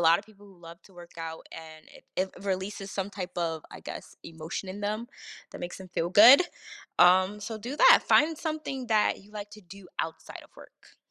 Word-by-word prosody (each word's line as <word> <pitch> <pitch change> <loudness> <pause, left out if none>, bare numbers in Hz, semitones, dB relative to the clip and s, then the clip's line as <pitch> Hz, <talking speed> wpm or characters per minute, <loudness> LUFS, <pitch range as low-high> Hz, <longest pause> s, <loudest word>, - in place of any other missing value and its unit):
lot 165 0 +5
of - - -20
people 205 -2 -19
who 195 -3 -18
love 170 +1 -12
to 195 - -20
work 175 -1 -14
out, 160 0 -7
and 155 -1 -12
it - - -17
it 190 +1 0
releases 195 +1 -3
some 195 0 -3
type 185 -2 -7
of, 165 -3 -2
I - - -10
guess, - - -9
emotion 165 +3 -7
in 195 +2 -7
them 215 +3 -3 0.4
that - - -9
makes 175 +1 -6
them 190 - -11
feel 170 -1 -2
good. 235 - +9 0.6
Um, 185 +3 +5
so 215 +2 -6
do 245 +7 -6
that. - - +7
Find 320 +1 +4
something 310 -6 -4
that 215 -2 +2
you 200 - -20
like 205 -1 -7
to - - -13
do 190 +1 -14
outside 160 0 -5
of - - -23
work. - - -18
190 Hz, 210 wpm, -28 LUFS, 175-210 Hz, 0.6 s, good